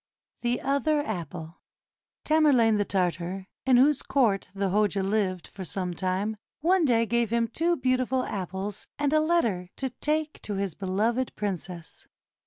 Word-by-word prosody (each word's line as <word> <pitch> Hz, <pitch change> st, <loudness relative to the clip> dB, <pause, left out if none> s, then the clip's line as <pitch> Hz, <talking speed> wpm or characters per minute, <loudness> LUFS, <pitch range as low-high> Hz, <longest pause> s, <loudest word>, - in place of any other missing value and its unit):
THE 240 Hz, 0 st, 0 dB
OTHER 280 Hz, +2 st, +1 dB
APPLE 170 Hz, -4 st, -6 dB, 0.6 s
Tamerlane 275 Hz, -9 st, +4 dB
the 205 Hz, -, +1 dB
Tartar, 180 Hz, 0 st, -1 dB, 0.2 s
in 255 Hz, -2 st, +6 dB
whose 280 Hz, +2 st, +4 dB
court 225 Hz, -8 st, +1 dB
the 195 Hz, 0 st, 0 dB
Hoja 205 Hz, -1 st, +2 dB
lived 190 Hz, -3 st, 0 dB
for 195 Hz, -, -8 dB
some 180 Hz, 0 st, -3 dB
time, 190 Hz, +5 st, -1 dB, 0.2 s
one 350 Hz, +1 st, +3 dB
day 230 Hz, -4 st, +3 dB
gave 235 Hz, -1 st, +1 dB
him 230 Hz, 0 st, +1 dB
two 335 Hz, +8 st, 0 dB
beautiful 255 Hz, -1 st, +1 dB
apples 195 Hz, 0 st, -4 dB
and 290 Hz, 0 st, +1 dB
a 310 Hz, -, +5 dB
letter 235 Hz, -, +1 dB
to 265 Hz, -2 st, -3 dB
take 305 Hz, +4 st, -2 dB
to 205 Hz, -, -3 dB
his 195 Hz, -3 st, -2 dB
beloved 215 Hz, -, -1 dB
princess. 180 Hz, -4 st, -5 dB
215 Hz, 150 wpm, -27 LUFS, 190-265 Hz, 0.6 s, in